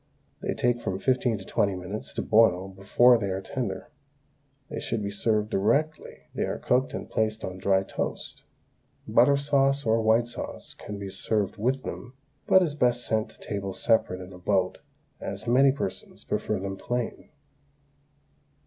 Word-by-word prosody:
They - - -2
take 120 -1 +1
from 95 - -2
fifteen 125 0 +1
to 95 - -10
twenty 100 -2 +1
minutes 90 +4 -5
to - - -1
boil 95 -4 +4
before 105 +6 +4
they 100 -3 -2
are 95 0 -1
tender. 100 -1 -4 0.8
They - - -5
should 115 -2 -2
be 100 - -2
served 105 +1 0
directly 140 +11 0
they - - -1
are - - -3
cooked 130 +1 +1
and - - -5
placed 110 0 -1
on 95 0 -5
dry 95 0 +3
toast. - - -4 0.7
Butter 140 +3 +5
sauce 140 -1 +2
or 115 0 +3
white 110 +2 +4
sauce 120 - -7
can 105 - -8
be 100 -1 -6
served 105 0 -1
with 130 +5 0
them, 125 +1 -7 0.3
but 190 - +6
is 160 -5 -1
best 125 -4 +2
sent 110 -1 0
to - - -20
table 100 -2 -4
separate 95 -5 +1
in 90 +1 -10
a 90 - -11
boat, 95 0 +1 0.4
as 100 +2 -5
many 130 +3 +5
persons 135 -8 -5
prefer 105 -2 -1
them 95 0 -4
plain. 120 +3 -3
110 Hz, 165 wpm, -27 LUFS, 95-125 Hz, 0.8 s, but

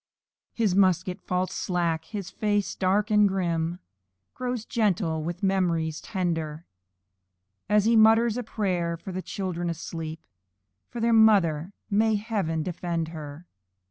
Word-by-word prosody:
His 220 -5 +1
musket 185 0 +2
falls 185 0 -1
slack, 170 -4 -1
his 200 -5 -6
face, 205 -2 0
dark 200 +3 +1
and 210 -1 +5
grim, 170 -3 -1 0.6
Grows 250 -3 -3
gentle 190 -8 0
with 175 +4 -5
memories 170 -5 0
tender, 165 -4 -3 1.0
As 210 0 +4
he 230 +1 +4
mutters 225 +1 +5
a 245 - -2
prayer 180 -7 -1
for 180 +3 -8
the 185 +1 -4
children 180 -3 -3
asleep, 165 -1 -6 0.7
And 235 - -2
their 235 0 +3
mother 195 -7 +4 0.2
"may 220 +2 +3
heaven 200 -7 -1
defend 170 -1 -3
her!" 155 0 -8
185 Hz, 130 wpm, -26 LUFS, 165-210 Hz, 1.0 s, and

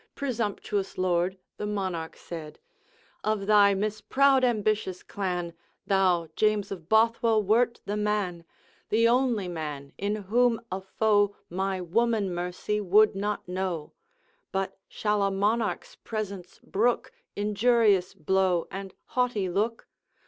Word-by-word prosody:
Presumptuous 210 -6 -2
Lord!' 185 0 +1 0.2
the 210 - -3
Monarch 185 -6 -3
said: 160 -3 -8 0.7
'Of 215 -2 0
thy 205 -1 +5
misproud 255 +7 +2
ambitious 215 -5 0
clan, 180 -4 -3 0.3
Thou, 185 -4 +2
James 215 -2 +1
of 175 -4 -7
Bothwell, 225 0 +3
wert 235 +4 +2
the 205 - -2
man, 205 -5 -1 0.5
The 230 +2 +4
only 240 -5 +2
man, 150 -5 -5
in 205 +1 0
whom 230 +3 +2
a 190 +1 -3
foe 205 +1 +2 0.2
My 190 +1 -1
woman 210 +1 +1
mercy 180 +4 -2
would 210 +3 +5
not 205 0 -2
know; 180 -4 -3 0.6
But 195 0 -2
shall 210 -1 0
a 200 - +3
Monarch's 205 0 -1
presence 200 -5 -6
brook 235 +5 0 0.2
Injurious 210 -2 +2
blow 185 +1 +1
and 195 0 -7
haughty 245 -7 0
look? 215 +6 -1
200 Hz, 120 wpm, -27 LUFS, 185-215 Hz, 0.7 s, thy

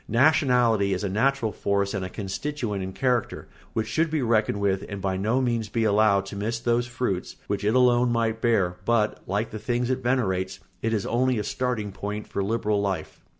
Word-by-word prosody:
Nationality 120 -6 +3
is 90 - -4
a 100 - -1
natural 115 +3 +1
force 100 0 0
and 95 -2 -2
a 95 - -4
constituent 105 +2 -3
in 95 0 -4
character 125 +2 -1 0.3
which 110 - 0
should 160 +9 +1
be 155 -3 0
reckoned 110 -3 +1
with 100 -1 +1
and 100 - -5
by 95 0 -1
no 110 +7 +1
means 115 -4 -1
be 115 +1 0
allowed 105 -2 +3
to 100 - -8
miss 110 +4 -2
those 120 +1 +1
fruits 120 -7 -3
which 100 -1 -2
it 105 +3 +2
alone 125 -1 +4
might 115 -1 0
bear; 100 -7 +2
but, 115 -2 +1
like 105 +3 -1
the 110 - -5
things 120 +3 -1
it 130 0 -1
venerates, 95 -7 0 0.2
it 115 - 0
is 105 -3 0
only 125 +1 +1
a 105 - -1
starting 110 -1 -2
point 105 +2 -5
for 100 - -3
liberal 105 -1 0
life. 100 -2 -3
110 Hz, 200 wpm, -25 LUFS, 100-120 Hz, 0.3 s, alone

